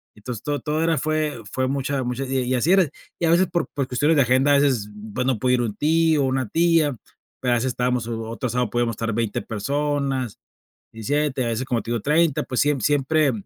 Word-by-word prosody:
entonces 110 +1 -7
to 145 -1 -1
todo 155 +1 -2
era 165 -1 +2
fue 155 -3 -1
fue 130 0 0
mucha 135 0 -1
mucha 125 +2 -3
y 135 0 -1
y 125 +1 0
así 140 +8 +2
era, 190 -5 +4 0.3
y 170 - +1
a - - +2
veces 185 +2 +4
por 170 -2 0
por 140 -2 -2
cuestiones 145 +6 +2
de 140 - +6
agenda 130 +3 +3
a - - +6
veces 130 -8 +1 0.2
pues 125 +3 -1
no 130 -4 +1
podía 125 +2 +2
ir 125 - 0
un 110 -4 -2
tío 160 -1 +2
o - - +2
una 130 -2 -1
tía, 165 0 +2 0.4
pero 125 - 0
a - - +3
veces 120 +3 -1
estábamos 125 -2 -1
o 115 -1 -3
otro 120 +2 -3
sábado 125 0 0
podíamos 120 -1 0
estar 115 +1 -3
20 115 -1 -1
personas, 135 +1 -2 0.5
17, 135 +3 -1
a - - -1
veces, 115 +2 -2
como 120 -3 -1
te - - -9
digo, 120 -2 -1
30, 150 +2 +2
pues 125 - -1
siem 145 -1 +2
siempre, 145 0 +2
130 Hz, 230 wpm, -23 LUFS, 120-150 Hz, 0.5 s, de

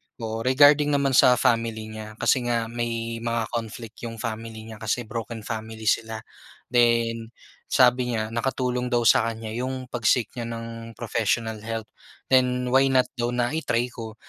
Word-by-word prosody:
oo, 110 -1 -4
regarding 145 +4 +5
naman 140 -1 +2
sa 125 0 +6
family 115 -2 0
niya 110 0 -8
kasi 130 - +2
nga 115 -1 -1
may 115 -1 -3
mga 115 -1 -2
conflict 115 -1 -6
yung 115 - -7
family 110 0 -5
niya, 110 -1 -10
kasi 110 +3 -1
broken 115 0 -6
family 110 0 -6
sila. 110 0 0 0.5
Then, 115 -1 +2 0.3
sabi 125 -1 +3
niya 110 0 -2
nakatulong 125 +1 -1
daw 120 -1 +1
sa 115 0 +5
kanya 110 -1 -5
yung 130 +2 -4
pag-seek 120 0 +1
nya 115 - -3
ng 115 0 -7
professional 115 -1 -1
help. 110 0 -5 0.4
Then 125 -1 +3
why 135 +1 +5
not 130 -1 +2
daw 120 - +1
na 120 +1 +1
i-try 125 -6 -1
ko. 110 -3 -8
115 Hz, 160 wpm, -25 LUFS, 110-125 Hz, 0.5 s, sa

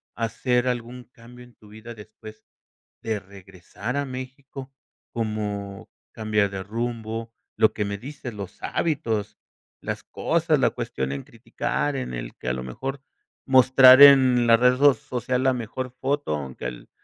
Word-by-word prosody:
hacer 125 +2 0
algún 125 0 -4
cambio 125 0 -15
en 120 -2 -19
tu 105 - -19
vida 110 +2 -11
después 110 0 -13 0.6
de 110 -2 -2
regresar 95 +5 -8
a 140 - -1
México? 130 +1 -8 0.4
Como 105 -3 -4 0.2
cambiar 105 -2 0
de 95 -1 -6
rumbo, 115 +1 -5 0.2
lo 110 0 +4
que 105 - -2
me 100 0 -4
dices, 130 +1 -8
los 100 -1 -8
hábitos, 115 -10 -2 0.4
las - - -5
cosas, - - 0
la - - +3
cuestión 65 0 -4
en 70 0 -5
criticar, - - -3
en 60 -1 -5
el - - -7
que - - -10
a 60 - +1
lo 65 0 -5
mejor 135 - -6 0.5
mostrar 130 0 +7
en 130 -4 +8
la 115 -1 +6
red 125 +1 +4
so 140 +1 +6
social 125 +1 -3
la 130 -1 +3
mejor 125 +2 -5
foto, 140 - -1
aunque 65 -4 -7
el 60 -1 -7
115 Hz, 155 wpm, -24 LUFS, 100-130 Hz, 0.6 s, en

